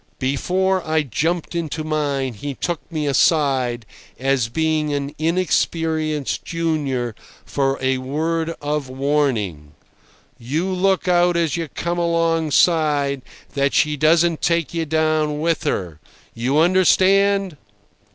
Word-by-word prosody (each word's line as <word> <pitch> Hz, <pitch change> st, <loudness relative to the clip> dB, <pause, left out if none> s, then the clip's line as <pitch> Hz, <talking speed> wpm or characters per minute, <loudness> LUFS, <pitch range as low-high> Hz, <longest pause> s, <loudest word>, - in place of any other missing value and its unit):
Before 185 Hz, +8 st, 0 dB
I 160 Hz, -1 st, +1 dB
jumped 165 Hz, -, -2 dB
into 160 Hz, -2 st, -3 dB
mine 145 Hz, -4 st, -1 dB
he 140 Hz, +6 st, -6 dB
took 175 Hz, +3 st, -4 dB
me 155 Hz, -2 st, -2 dB
aside, 135 Hz, -5 st, +2 dB, 0.3 s
as 130 Hz, -2 st, 0 dB
being 155 Hz, +2 st, 0 dB
an 140 Hz, 0 st, -3 dB
inexperienced 160 Hz, -3 st, 0 dB
junior, 145 Hz, -8 st, -2 dB, 0.3 s
for 135 Hz, -1 st, 0 dB
a 130 Hz, 0 st, 0 dB
word 160 Hz, +5 st, -2 dB
of 145 Hz, -2 st, -2 dB
warning: 130 Hz, -, -1 dB, 0.7 s
"You 145 Hz, +9 st, -2 dB
look 190 Hz, 0 st, +1 dB
out 175 Hz, -1 st, +3 dB
as 165 Hz, -4 st, 0 dB
you 165 Hz, -1 st, -3 dB
come 170 Hz, +4 st, -3 dB
alongside 160 Hz, -4 st, +2 dB, 0.3 s
that 140 Hz, -1 st, 0 dB
she 150 Hz, 0 st, +3 dB
doesn't 165 Hz, +2 st, +3 dB
take 170 Hz, 0 st, 0 dB
you 165 Hz, -1 st, -2 dB
down 155 Hz, -1 st, +1 dB
with 165 Hz, +1 st, 0 dB
her. 90 Hz, -, -2 dB, 0.3 s
You 125 Hz, +5 st, -1 dB
understand?" 190 Hz, +1 st, +3 dB
155 Hz, 120 wpm, -21 LUFS, 140-170 Hz, 0.7 s, out